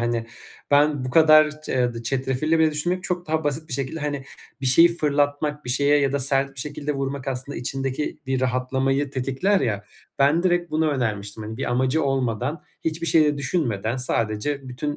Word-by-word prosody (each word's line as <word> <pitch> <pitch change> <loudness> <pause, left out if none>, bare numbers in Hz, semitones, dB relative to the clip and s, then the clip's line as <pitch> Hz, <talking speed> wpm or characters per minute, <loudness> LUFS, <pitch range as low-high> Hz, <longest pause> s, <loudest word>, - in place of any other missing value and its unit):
hani, 120 -1 -1 0.4
ben 145 -1 +3
bu 130 - -3
kadar 155 0 +6
ce - - -5 0.2
eee, 115 - -6
çetrefilli 135 +6 0
bile 160 -1 +4
düşünmeyip 175 +5 -2
çok 180 -1 -3
daha 160 0 -1
basit 155 +2 -2
bir - - -2
şekilde, 140 +4 -2
hani, 145 -2 -3 0.4
bir 130 - -2
şeyi 165 +7 +7
fırlatmak 145 0 0
bir 125 - -2
şeye 145 +3 +4
ya 135 -1 +1
da 140 - 0
sert 135 0 +2
bir 125 - -4
şekilde 150 +1 -3
vurmak 135 0 -3
aslında 130 +2 -4
içindeki 135 +3 -3
bir 130 -1 -1
rahatlamayı 130 +2 0
tetikler 135 +10 0
ya, 100 -4 -1 0.3
ben 145 +5 +3
direkt 175 -1 +1
bunu 155 +1 +1
önermiştim, 110 -6 -3
hani, 110 +1 -6
bir 135 - -3
amacı 130 +5 +1
olmadan, 135 +2 -1 0.2
hiçbir 160 +1 -2
şeyi 160 -2 +5
de 145 -1 0
düşünmeden 120 - -1
sadece 125 +3 -1
bütün 145 +4 -4
140 Hz, 185 wpm, -23 LUFS, 130-150 Hz, 0.4 s, şeyi